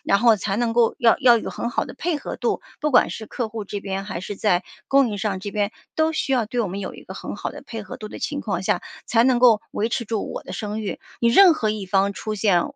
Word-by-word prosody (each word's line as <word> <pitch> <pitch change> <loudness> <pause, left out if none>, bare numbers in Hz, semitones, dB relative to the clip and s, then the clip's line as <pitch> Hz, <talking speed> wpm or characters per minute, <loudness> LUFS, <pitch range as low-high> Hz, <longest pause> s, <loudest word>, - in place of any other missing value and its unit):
然 200 - +3
后 230 0 +6
才 200 0 -2
能 235 -1 0
够 230 -1 +3
要 230 -2 +5
要 240 -3 +6
有 - - -5
很 235 - -3
好 - - 0
的 - - -10
配 320 +2 -1
合 - - -6
度。 - - -1 0.2
不 300 0 0
管 245 - +5
是 220 - -6
客 235 0 -3
户 220 -1 -5
这 205 +1 -5
边， 195 0 -4
还 205 -4 -5
是 200 +2 -5
在 185 -3 +1 0.2
供 275 -2 +4
应 205 -2 -4
商 200 -3 -1
这 200 +1 -6
边， 205 -1 0 0.2
都 315 0 +2
需 275 -3 -1
要 240 -4 +2
对 240 +2 -1
我 215 - 0
们 195 +2 -5
有 195 - -5
一 - - -12
个 - - -9
很 - - -6
好 - - -4
的 - - -10
配 225 -2 -6
合 - - -8
度 215 - -8
的 - - -8
情 290 -1 -3
况 195 -8 -2
下， - - +1 0.2
才 230 0 +4
能 250 -1 +4
够 235 -4 +5
维 220 +2 -1
持 235 - -2
住 220 -1 -3
我 - - -5
的 - - -9
声 210 0 -4
誉。 210 - -4 0.2
你 235 - +4
任 355 +6 +7
何 215 -7 0
一 210 -2 -4
方 195 +1 +2
出 215 +2 -4
现， 195 -4 +3
220 Hz, 305 characters per minute, -23 LUFS, 200-240 Hz, 0.2 s, 任